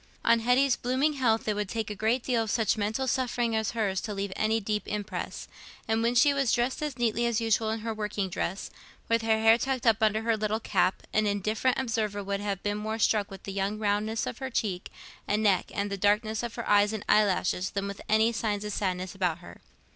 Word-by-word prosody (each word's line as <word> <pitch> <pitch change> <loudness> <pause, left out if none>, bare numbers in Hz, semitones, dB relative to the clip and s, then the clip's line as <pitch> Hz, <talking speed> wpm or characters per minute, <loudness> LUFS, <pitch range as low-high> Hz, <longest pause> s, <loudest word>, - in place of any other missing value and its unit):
On 230 0 +5
Hetty's 250 +3 +3
blooming 260 +5 0
health 235 -6 +1
it 215 - +2
would 205 -2 -2
take 225 -2 -3
a - - -4
great 225 +5 0
deal 240 -3 +1
of 220 - -3
such 220 -2 +2
mental 220 +5 -1
suffering 240 -3 0
as 220 0 -1
hers 195 -4 0
to 210 - -5
leave 195 -1 -3
any 220 +1 +1
deep 210 0 -3
impress; 210 -1 -4 0.4
and 225 0 +1
when 235 +1 +1
she 280 +4 +5
was 275 -4 +1
dressed 245 +3 0
as 295 -4 -3
neatly 235 0 +1
as 235 -1 +1
usual 225 -1 +1
in 220 0 -2
her 225 0 -3
working 210 -2 -2
dress, 185 +1 -4 0.4
with 230 0 +2
her 225 -1 +2
hair 225 +1 +5
tucked 260 -1 -2
up 225 -1 +4
under 220 0 +2
her 230 0 +2
little 215 0 -1
cap, 190 -4 0
an 215 0 +2
indifferent 215 +5 0
observer 215 -5 -1
would 200 0 -2
have 200 -2 -3
been 205 0 -1
more 220 +1 -3
struck 210 -2 +2
with 195 - -10
the 195 - -6
young 200 +2 -1
roundness 215 +1 0
of - - -5
her 265 -1 -4
cheek 195 -6 -2 0.4
and 210 +1 +1
neck 195 -4 +2
and 200 -1 -2
the 200 - -2
darkness 210 +2 +1
of 235 -1 -5
her 235 - -5
eyes 205 +1 +4
and 215 - -5
eyelashes 195 -3 +2
than 200 0 -3
with 200 0 -7
any 220 +2 +4
signs 210 -2 -2
of 210 - -3
sadness 185 -2 -2
about 180 -4 0
her. 175 - -13
215 Hz, 230 wpm, -28 LUFS, 205-230 Hz, 0.4 s, On